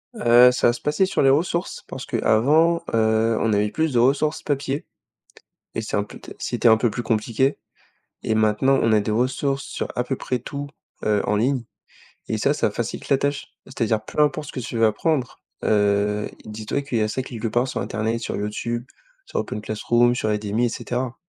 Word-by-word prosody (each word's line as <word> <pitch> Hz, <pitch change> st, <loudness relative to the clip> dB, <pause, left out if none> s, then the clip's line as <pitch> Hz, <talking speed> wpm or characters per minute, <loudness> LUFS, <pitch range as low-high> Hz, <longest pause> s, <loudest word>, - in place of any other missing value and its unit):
Heu, 120 Hz, -, +6 dB
ça 125 Hz, -, +2 dB
va 120 Hz, -, +3 dB
se -, -, -8 dB
passer 150 Hz, +6 st, +2 dB
sur 190 Hz, -, 0 dB
les 135 Hz, -, +5 dB
ressources 170 Hz, +5 st, 0 dB
parce -, -, -7 dB
qu'avant, 160 Hz, +9 st, +3 dB
heu, 110 Hz, 0 st, +2 dB
on 110 Hz, -2 st, +1 dB
avait 105 Hz, +1 st, +2 dB
plus 160 Hz, 0 st, -1 dB
de 120 Hz, -, +3 dB
ressources 145 Hz, +5 st, +2 dB
papier 140 Hz, 0 st, -2 dB, 0.9 s
et 115 Hz, -, -2 dB
c'est 110 Hz, -, -3 dB
un 100 Hz, -, +2 dB
peut-être -, -, -12 dB
c'était 120 Hz, -, +1 dB
un 110 Hz, 0 st, +6 dB
peu 120 Hz, -, +2 dB
plus 120 Hz, +4 st, -4 dB
compliqué 115 Hz, +5 st, 0 dB, 0.7 s
et 110 Hz, -, 0 dB
maintenant, 110 Hz, +5 st, +3 dB
on 115 Hz, -, +2 dB
a 105 Hz, -, +5 dB
des 105 Hz, -, -2 dB
ressources 135 Hz, +4 st, 0 dB
sur -, -, -4 dB
à 125 Hz, -, 0 dB
peu 130 Hz, +2 st, -2 dB
près 125 Hz, -1 st, -3 dB
tout, 140 Hz, +4 st, -6 dB, 0.4 s
heu, 105 Hz, -1 st, +2 dB
en 105 Hz, -, +2 dB
ligne 125 Hz, +4 st, +1 dB, 0.7 s
et -, -, 0 dB
ça, -, -, +2 dB
ça -, -, +1 dB
facilite -, -, -4 dB
la 135 Hz, -, +4 dB
tâche. 140 Hz, 0 st, -1 dB, 0.2 s
C'est-à-dire 115 Hz, -4 st, -1 dB
peu -, -, -4 dB
importe 150 Hz, -1 st, +1 dB
ce -, -, -8 dB
que -, -, -4 dB
tu 115 Hz, -, -5 dB
veux 115 Hz, -, +3 dB
apprendre, 135 Hz, +2 st, -1 dB, 0.2 s
heu, 105 Hz, 0 st, +2 dB, 0.2 s
dis-toi 110 Hz, +6 st, -4 dB
qu'il 130 Hz, -5 st, -2 dB
y -, -, +2 dB
a 105 Hz, -, +1 dB
ça 130 Hz, +4 st, -2 dB
quelque 120 Hz, -3 st, -4 dB
part 120 Hz, +3 st, +1 dB
sur -, -, -3 dB
internet, 110 Hz, +2 st, -2 dB
sur -, -, -4 dB
YouTube, 115 Hz, +3 st, -3 dB, 0.4 s
sur -, -, -2 dB
OpenClassroom, 120 Hz, +3 st, +1 dB
sur 110 Hz, -3 st, -1 dB
Udemy 105 Hz, +3 st, 0 dB
et -, -, +1 dB
cetera. 125 Hz, +2 st, -4 dB
120 Hz, 205 wpm, -23 LUFS, 110-135 Hz, 0.9 s, Heu